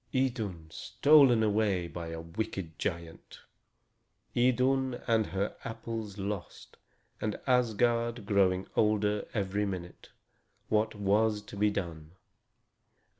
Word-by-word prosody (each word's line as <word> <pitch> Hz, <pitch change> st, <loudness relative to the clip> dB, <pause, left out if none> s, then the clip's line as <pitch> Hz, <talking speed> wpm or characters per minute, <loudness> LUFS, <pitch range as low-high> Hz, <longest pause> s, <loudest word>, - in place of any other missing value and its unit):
Idun 110 Hz, -10 st, -1 dB
stolen 120 Hz, -, +5 dB
away 105 Hz, -4 st, +1 dB
by 85 Hz, 0 st, -6 dB
a 80 Hz, 0 st, -5 dB
wicked 85 Hz, -1 st, -5 dB
giant! 85 Hz, -2 st, -5 dB, 0.9 s
Idun 130 Hz, +1 st, +2 dB
and 110 Hz, -2 st, +2 dB
her 100 Hz, +2 st, -2 dB
apples 115 Hz, -2 st, -5 dB
lost, 100 Hz, -2 st, -6 dB, 0.4 s
and 105 Hz, -1 st, -2 dB
Asgard 120 Hz, -2 st, +1 dB
growing 95 Hz, -2 st, +2 dB
older 105 Hz, -1 st, +1 dB
every 100 Hz, 0 st, 0 dB
minute! 90 Hz, -2 st, -7 dB, 0.6 s
What 110 Hz, +1 st, +1 dB
was 105 Hz, +1 st, +1 dB
to -, -, -11 dB
be 105 Hz, +1 st, +3 dB
done? 85 Hz, -5 st, -5 dB
105 Hz, 105 wpm, -30 LUFS, 95-115 Hz, 0.9 s, stolen